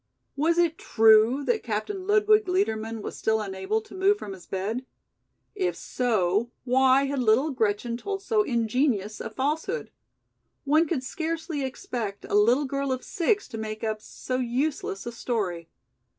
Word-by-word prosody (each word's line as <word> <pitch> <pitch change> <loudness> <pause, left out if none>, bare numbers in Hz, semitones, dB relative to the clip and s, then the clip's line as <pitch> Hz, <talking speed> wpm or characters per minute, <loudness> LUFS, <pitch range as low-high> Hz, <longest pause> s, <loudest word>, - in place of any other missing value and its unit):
Was 320 +4 +2
it 340 -2 +2
true 225 +5 +5
that 445 +4 +1
Captain 370 - -3
Ludwig 425 0 +4
Liedermann 225 - -1
was - - -5
still 220 0 +1
unable 195 +1 -2
to - - -15
move 390 +2 +3
from 200 - -7
his 185 -2 -13
bed? 205 +6 -3 0.7
If 375 -3 -1
so 220 -3 0
why 265 +2 +4
had 275 0 -2
little 250 +6 +3
Gretchen 230 -1 0
told 395 +7 -4
so 440 -1 +2
ingenious 235 - 0
a - - -4
falsehood? 315 - -2 0.7
One 310 +4 +3
would 280 -7 -1
scarcely 320 +1 -3
expect 235 -5 -4
a - - -7
little 235 +8 +4
girl 275 0 -2
of 255 -1 -2
six 400 +4 0
to 225 - -6
make 215 0 -5
up 215 -1 -2
so 255 +3 -4
useless 250 -4 -2
a 235 - -4
story. 195 -9 -3
255 Hz, 155 wpm, -26 LUFS, 220-320 Hz, 0.7 s, true